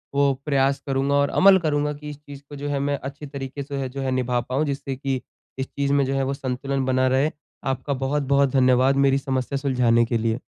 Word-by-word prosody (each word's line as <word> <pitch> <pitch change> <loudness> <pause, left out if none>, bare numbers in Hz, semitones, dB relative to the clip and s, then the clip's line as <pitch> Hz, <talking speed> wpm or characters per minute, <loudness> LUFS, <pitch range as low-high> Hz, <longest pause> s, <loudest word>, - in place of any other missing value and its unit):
वो 140 -1 +3
प्रयास 140 -2 +2
करूँगा 135 +1 +1
और 140 0 +3
अमल 195 0 +6
करूँगा 150 -3 0
कि 150 +1 -9
इस 145 - -8
चीज़ 140 -1 -10
को 145 - -8
जो 145 +1 -4
है 140 -1 -1
मैं 140 +1 0
अच्छी 140 +2 -7
तरीक़े 135 0 -6
से 140 -1 -4
जो 135 +2 -6
है 130 -1 -1
निभा 125 -1 0
पाऊँ, 130 +5 -1
जिससे 140 -1 -3
कि 135 -1 -2 0.4
इस 130 - -2
चीज़ 140 0 -1
में 140 -1 +3
जो 135 - -2
है 135 - +1
वो 135 +1 -1
संतुलन 135 0 -2
बना 130 0 +2
रहे। 135 +4 +2 0.4
आपका 135 +2 -1
बहुत-बहुत 140 0 +1
धन्यवाद 130 0 +4
मेरी 135 0 +3
समस्या 135 0 -2
सुलझाने 125 -4 +2
के 115 0 0
लिए। 115 +2 -1
135 Hz, 220 wpm, -23 LUFS, 130-140 Hz, 0.4 s, अमल